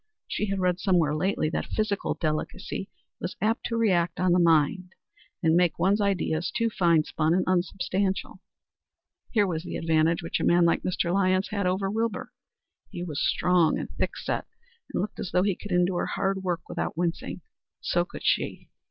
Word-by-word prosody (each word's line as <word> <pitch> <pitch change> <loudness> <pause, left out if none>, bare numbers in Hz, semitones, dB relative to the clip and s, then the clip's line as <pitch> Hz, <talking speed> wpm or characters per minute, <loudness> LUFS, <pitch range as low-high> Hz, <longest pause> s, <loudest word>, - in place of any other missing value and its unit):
She 210 - -2
had 195 0 -1
read 180 -1 +1
somewhere 175 -6 +2
lately 155 +1 0
that - - -2
physical 215 -2 0
delicacy 155 -2 -3 0.3
was - - -4
apt 225 +2 0
to 230 - -2
react 180 -6 +2
on 185 0 +3
the 180 - +4
mind 170 +2 +2 0.5
and 160 0 +4
make 175 -2 +3
one's 195 +5 +2
ideas 180 -4 0
too 230 -1 0
fine 170 -5 +3
spun 155 +2 0
and 185 - +2
unsubstantial. 185 +1 -1 0.9
Here 210 -3 +3
was 165 -4 -2
the 175 - -5
advantage 165 0 +2
which 165 - -2
a - - -2
man 175 0 +4
like 170 - +2
Mr. 175 -1 -1
Lyons 185 0 +2
had 200 -3 -1
over 190 +2 0
Wilbur. 225 +1 -2 0.6
He 175 - -6
was 155 -5 -3
strong 175 -3 +3
and - - -5
thickset, - - -2 0.5
and - - -1
looked 210 - -6
as 200 - -3
though 180 - +3
he 200 -2 +1
could 205 - -9
endure 180 0 +1
hard 195 0 -1
work 180 -3 -1
without - - -3
wincing. 170 0 -2 0.4
So - - +1
could - - -10
she. - - 0
180 Hz, 180 wpm, -27 LUFS, 170-195 Hz, 0.9 s, the